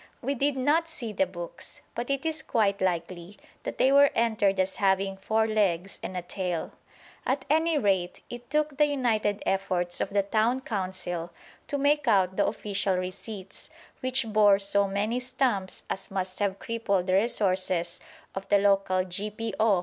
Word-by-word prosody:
We 275 - -1
did 280 +1 0
not 300 +6 +2
see 240 -9 -5
the 285 +5 +1
books, - - -8
but 240 +2 -4
it 275 +2 -1
is 315 -1 -1
quite 200 -3 +1
likely 175 +1 -2 0.2
that - - -5
they 265 - +4
were 280 0 +7
entered 215 -4 +2
as 190 0 0
having 195 0 +2
"four 220 +3 +1
legs 195 -4 0
and 185 - -5
a 180 - -3
tail." 180 -2 -3 0.5
At 265 0 -1
any 320 +1 +3
rate 190 -7 +1
it 240 0 -9
took 300 0 0
the 295 0 +5
united 225 -7 0
efforts 180 -2 0
of - - -1
the 200 0 +1
Town 220 +6 +1
Council 185 -6 -3 0.4
to 285 - -1
make 285 0 +2
out 190 -4 +3
the 200 - +2
official 200 -2 -1
receipts, 185 +2 -6 0.3
which 255 0 0
bore 210 -2 +5
so 200 0 +1
many 210 +5 -1
stamps 245 -7 -1
as 190 - -4
must 185 -1 -3
have 200 -2 0
crippled 200 -5 -1
the 185 - 0
resources 185 -4 +2 0.3
of 195 0 -6
the 205 - +6
local 195 -2 +2
G.P.O. 210 +4 -4
205 Hz, 165 wpm, -27 LUFS, 190-245 Hz, 0.5 s, were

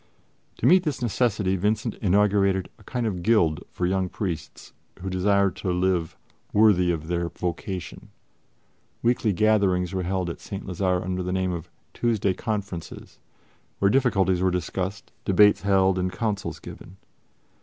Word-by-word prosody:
To - - -3
meet 185 +1 +6
this 150 -6 -2
necessity 105 -5 +1
Vincent 105 +4 0
inaugurated 100 -1 +2
a - - -17
kind 125 -2 -3
of 95 -5 -2
guild 85 -7 +2
for 90 - -2
young 95 0 0
priests 85 -7 -5 0.3
who 95 +1 -5
desire 100 +1 +2
to 90 - -3
live 90 -2 0 0.4
worthy 100 -5 +4
of 80 -2 -3
their 85 0 -1
vocation. 90 +1 -5 0.9
Weekly 120 -2 +2
gatherings 95 -3 +2
were 95 - -1
held 90 0 -1
at - - -9
St. 100 - -7
Lazare 90 -1 0
under 90 0 -2
the 90 0 -3
name 95 0 0
of 85 -2 -6 0.2
"Tuesday 110 -5 +1
Conferences," 100 -5 -5 0.6
where 100 0 +3
difficulties 95 -9 +2
were 95 - +3
discussed, 90 +3 -3
debates 105 +1 +5
held 95 -1 +3
and 90 0 -1
counsels 105 -2 -3
given. 95 - -11
95 Hz, 145 wpm, -25 LUFS, 90-105 Hz, 0.9 s, meet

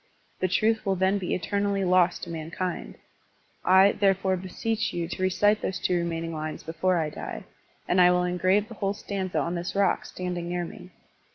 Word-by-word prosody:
The 185 - +1
truth 215 +5 +2
will 195 -1 +1
then 190 +2 +2
be 180 - -1
eternally 200 +3 -1
lost 180 -1 +3
to 170 - -5
mankind. 165 +2 -4 0.7
I, 190 +2 +6
therefore, 195 -1 +2
beseech 215 +5 -2
you 170 -1 -2
to 180 - -6
recite 205 +3 +3
those 190 - -2
two 180 - 0
remaining 165 -1 -2
lines 155 0 -5
before 170 +3 0
I 155 -2 -1
die, - - -6 0.4
and 180 - +4
I 180 - +7
will 180 0 +3
engrave 185 +4 +2
the 230 - -9
whole 200 -2 -2
stanza 195 -3 -4
on 170 - 0
this 175 +2 -4
rock 200 0 +2
standing 180 -1 -4
near 175 0 -2
by. 180 - -11
185 Hz, 185 wpm, -26 LUFS, 175-195 Hz, 0.7 s, I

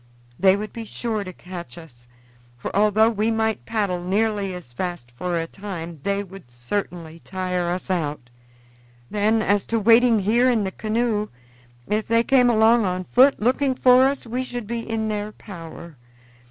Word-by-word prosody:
They 190 0 +5
would 210 +1 -5
be 230 -1 -6
sure 220 -1 -3
to 185 - -7
catch 175 -7 -9
us, 120 -8 -14 0.5
for - - -6
although 215 +2 +4
we 215 0 0
might 220 -1 -1
paddle 200 -6 -1
nearly 205 +1 0
as 140 -10 -11
fast 175 -5 -5
for 175 +6 -2
a 165 - -1
time, 170 -3 -7
they 200 +3 -1
would 190 -8 -13
certainly 165 +6 -5
tire 180 -2 -2
us 180 +2 -3
out. 150 -8 -3 0.8
Then, 215 +2 +2
as 205 -1 +1
to 230 - 0
waiting 230 +2 +5
here 230 +6 +3
in 230 -4 +2
the 190 - -2
canoe, 215 0 -1 0.6
if 215 +1 -1
they 230 +1 +3
came 250 -1 +4
along 225 0 +4
on 185 -1 -1
foot 260 +8 +4
looking 260 +4 +1
for 255 +1 +6
us 275 -1 -3
we 245 +3 -3
should 245 -3 -6
be 235 +3 -3
in 220 -1 -1
their 210 0 -3
power. 170 -4 -10
205 Hz, 170 wpm, -23 LUFS, 180-225 Hz, 0.8 s, for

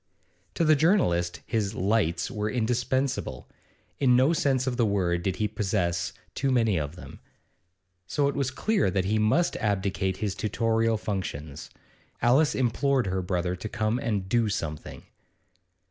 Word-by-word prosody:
To 170 - +1
the 155 0 +6
journalist 115 - +2
his 105 -3 -1
'lights' 100 -4 0
were 105 0 -2
indispensable; 125 +3 -1 0.5
in 125 -3 +4
no 130 +6 +4
sense 135 -5 +1
of 130 -2 -1
the 120 -2 +2
word 90 -4 0
did 95 +1 -1
he 105 +2 0
possess 95 -5 -1 0.2
too 135 - -1
many 115 -6 +2
of 75 +2 -4
them; 90 - -11 0.9
so 140 +9 +1
it 140 - 0
was 140 -2 -1
clear 165 - +1
that 95 0 0
he 110 +3 +1
must 140 +12 +2
abdicate 95 -2 -1
his 105 -3 -2
tutorial 115 +1 0
functions. 80 -8 -5 0.5
Alice 135 +6 +3
implored 130 +1 +1
her 95 0 -1
brother 90 -1 -1
to 95 +4 -6
come 110 +1 -1
and 105 -5 -2
'do 115 +1 +2
something. 75 -6 -5
110 Hz, 150 wpm, -27 LUFS, 95-125 Hz, 0.9 s, the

